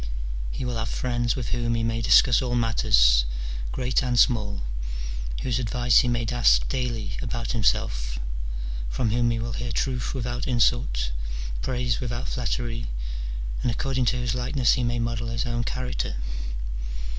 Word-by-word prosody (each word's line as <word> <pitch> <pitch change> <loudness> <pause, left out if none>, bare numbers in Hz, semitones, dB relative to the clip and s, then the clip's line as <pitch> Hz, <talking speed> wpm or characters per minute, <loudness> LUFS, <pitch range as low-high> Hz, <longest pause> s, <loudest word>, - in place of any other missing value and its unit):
he 125 - -4
will 120 -1 -2
have 110 0 -2
friends 120 -1 0
with 125 -3 -3
whom 120 -1 0
he 115 - 0
may 115 0 0
discuss 120 +1 +6
all 125 -2 -1
matters, 110 - +4 0.5
great 125 0 +1
and 125 -2 0
small, 105 - +3 0.8
whose 125 -2 0
advice 120 0 +4
he - - +2
may 120 -1 +1
ask 120 +1 +4
daily 120 -5 -2
about 120 -1 -3
him 115 -3 -1
self, - - +1 0.7
from 115 - 0
whom 120 +1 +2
he 115 - 0
will 115 0 -3
hear 120 +2 -3
truth 125 +2 -1
without 125 0 -2
insult, 115 - +2 0.5
praise 125 - 0
without 120 0 -3
flattery, 120 -1 -2 0.7
and - - +1
according 130 +2 0
to 125 +1 +2
whose 120 -2 -1
likeness 125 0 +2
he 125 - +1
may 120 0 0
model 115 0 -1
his 115 0 -1
own 120 0 -1
character. 125 - -2
120 Hz, 155 wpm, -26 LUFS, 115-125 Hz, 0.8 s, discuss